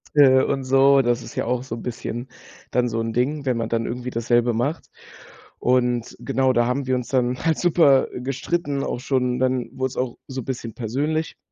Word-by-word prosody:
äh, 130 Hz, -2 st, +7 dB
und 135 Hz, -1 st, -1 dB
so. 135 Hz, +1 st, +5 dB
Das 120 Hz, 0 st, +1 dB
ist 115 Hz, -, -11 dB
ja -, -, -1 dB
auch 125 Hz, +1 st, 0 dB
so 130 Hz, -, -5 dB
'n 115 Hz, -, -9 dB
bisschen 120 Hz, +1 st, -5 dB, 0.4 s
dann 125 Hz, -1 st, +1 dB
so 115 Hz, 0 st, -2 dB
'n 115 Hz, 0 st, -3 dB
Ding, 140 Hz, +4 st, 0 dB
wenn 125 Hz, -3 st, +1 dB
man 115 Hz, -1 st, -2 dB
dann 115 Hz, 0 st, 0 dB
irgendwie 125 Hz, +1 st, -4 dB
dasselbe 120 Hz, +1 st, +1 dB
macht. 140 Hz, +8 st, -2 dB, 0.7 s
Und 125 Hz, -1 st, +1 dB
genau 130 Hz, -1 st, +1 dB
da 120 Hz, -1 st, +3 dB
haben 130 Hz, +2 st, -1 dB
wir 130 Hz, -, +2 dB
uns 125 Hz, -1 st, -4 dB
dann 125 Hz, -1 st, +1 dB
halt 160 Hz, -2 st, +2 dB
super 155 Hz, -6 st, +4 dB
gestritten, 140 Hz, +3 st, -2 dB
auch -, -, -3 dB
schon, 125 Hz, -2 st, 0 dB
dann 130 Hz, -1 st, 0 dB
wurde 130 Hz, 0 st, -1 dB
es -, -, -11 dB
auch 125 Hz, -2 st, -2 dB
so 130 Hz, -1 st, -5 dB
'n -, -, -12 dB
bisschen 120 Hz, -4 st, -5 dB
persönlich. 145 Hz, +7 st, -2 dB
125 Hz, 210 wpm, -23 LUFS, 120-135 Hz, 0.7 s, äh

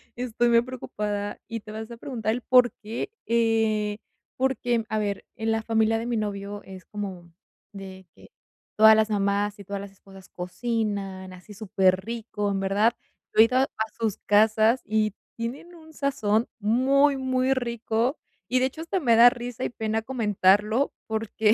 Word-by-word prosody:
Estoy 240 Hz, -1 st, 0 dB
muy 235 Hz, 0 st, +5 dB
preocupada 210 Hz, -5 st, -4 dB
y 230 Hz, 0 st, -4 dB
te 215 Hz, -, -11 dB
vas 220 Hz, +1 st, -7 dB
a 235 Hz, -, -8 dB
preguntar 230 Hz, -4 st, -3 dB
el 245 Hz, -, -3 dB
porqué, 245 Hz, -, +2 dB, 0.2 s
eh, 225 Hz, -2 st, +1 dB, 0.4 s
porque, 245 Hz, -3 st, 0 dB
a 215 Hz, -, 0 dB
ver, 205 Hz, -2 st, -2 dB
en 225 Hz, 0 st, -1 dB
la 225 Hz, 0 st, 0 dB
familia 225 Hz, 0 st, +2 dB
de 230 Hz, -, -4 dB
mi 240 Hz, -1 st, -1 dB
novio 205 Hz, -1 st, -4 dB
es 190 Hz, -1 st, -11 dB
como 190 Hz, -5 st, -7 dB, 0.4 s
de 190 Hz, -1 st, -10 dB
que -, -, -18 dB, 0.5 s
todas 220 Hz, 0 st, +8 dB
las 215 Hz, 0 st, +2 dB
mamás 205 Hz, 0 st, 0 dB
y -, -, -8 dB
todas 200 Hz, +1 st, -5 dB
las 200 Hz, 0 st, -9 dB
esposas 195 Hz, -1 st, -16 dB
cocinan 195 Hz, -1 st, -3 dB
así 185 Hz, +3 st, -13 dB
superrico. 205 Hz, +1 st, 0 dB
En 195 Hz, -, -1 dB
verdad. 200 Hz, +4 st, +2 dB, 0.4 s
Yo -, -, +8 dB
he -, -, +11 dB
ido 250 Hz, +2 st, 0 dB
a 265 Hz, +1 st, +3 dB, 0.3 s
sus 220 Hz, -3 st, -1 dB
casas 215 Hz, +3 st, +4 dB
y 215 Hz, -1 st, +1 dB, 0.2 s
tienen 250 Hz, +10 st, -6 dB
un 320 Hz, -2 st, -15 dB
sazón 230 Hz, -7 st, 0 dB
muy, 270 Hz, +6 st, +3 dB
muy 260 Hz, 0 st, +1 dB
rico 235 Hz, +1 st, -1 dB, 0.3 s
y, 255 Hz, -, +2 dB
de 255 Hz, -, +2 dB
hecho, 295 Hz, +5 st, -9 dB
hasta 340 Hz, +3 st, -2 dB
me 240 Hz, -8 st, +3 dB
da 240 Hz, +2 st, +8 dB
risa 245 Hz, 0 st, -6 dB
y -, -, -1 dB
pena 220 Hz, -1 st, -2 dB
comentarlo 215 Hz, 0 st, +2 dB
porque, 220 Hz, -1 st, +1 dB
220 Hz, 165 wpm, -25 LUFS, 205-240 Hz, 0.5 s, he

